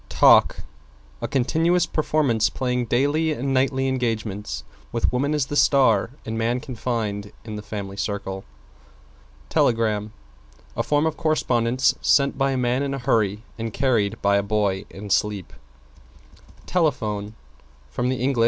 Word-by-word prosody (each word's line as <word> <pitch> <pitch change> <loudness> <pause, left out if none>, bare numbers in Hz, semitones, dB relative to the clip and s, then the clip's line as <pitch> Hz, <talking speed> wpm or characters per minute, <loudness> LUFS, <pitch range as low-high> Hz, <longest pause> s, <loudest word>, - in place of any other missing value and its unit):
=TALK= - - +5 0.6
A - - -2
continuous 160 +6 +2
performance 135 -8 +1
playing 125 0 -1
daily 145 +7 +1
and 135 0 -2
nightly 135 0 +1
engagements, 115 -5 -2 0.3
with 115 +1 0
Woman 140 +4 +1
as 145 -3 +1
the 145 - -5
star 130 -8 +4 0.2
and 110 - -4
Man 120 +2 0
confined 110 -5 -3
in 110 -2 -6
the 105 - -5
Family 100 -2 -6
Circle. 95 -1 -3 1.1
=TELEGRAM= 110 -3 +1 0.6
A - - 0
form 150 +1 +1
of 160 -1 -1
correspondence 130 -6 +1
sent 140 -1 +3
by 135 0 +1
a 135 - 0
man 125 +1 +1
in 140 -1 -1
a - - -4
hurry 110 -5 0 0.2
and 115 0 -3
carried 115 -4 0
by 100 0 +4
a - - +2
boy 100 -2 0
in 100 +1 -8
sleep. 105 -3 0 1.1
=TELEPHONE= 110 - -1 0.6
From 125 - -1
Eng. 130 +1 0
120 Hz, 140 wpm, -23 LUFS, 105-135 Hz, 1.1 s, =TALK=